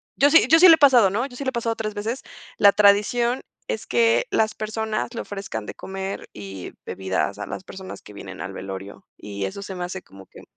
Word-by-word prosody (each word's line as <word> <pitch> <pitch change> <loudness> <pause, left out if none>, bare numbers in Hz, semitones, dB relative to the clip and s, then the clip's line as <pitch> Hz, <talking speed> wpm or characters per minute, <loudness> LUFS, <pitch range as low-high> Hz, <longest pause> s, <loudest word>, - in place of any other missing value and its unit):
yo 285 +1 +5
sí, 325 - +6
yo 325 +1 +6
sí 365 - +9
le 325 - +10
he - - -16
pasado, 250 -8 +6
¿no?, 225 +7 -1
yo 250 -3 -10
sí 280 - -5
le 260 - 0
he - - -7
pasado 230 -1 -1
3 215 -1 -4
veces. 225 +5 -3 0.4
La 200 - +7
tradición 210 +5 +3 0.3
es 220 - -3
que 115 -1 +3
las 220 -1 +2
personas 220 +2 -3
le - - -3
ofrezcan 195 - -6
de - - -7
comer 195 0 -6
y 95 -2 -8
bebidas 95 +1 -2
a 105 - -4
las - - -6
personas 190 -1 -9
que 105 - -14
vienen 95 -1 -9
al 95 - -6
velorio, 95 +1 -8
y 100 -1 -6
eso 150 - -6
se 190 -1 -7
me 180 - -4
hace 190 +1 -6
como 95 0 -15
que - - -15
200 Hz, 235 wpm, -23 LUFS, -, 0.4 s, le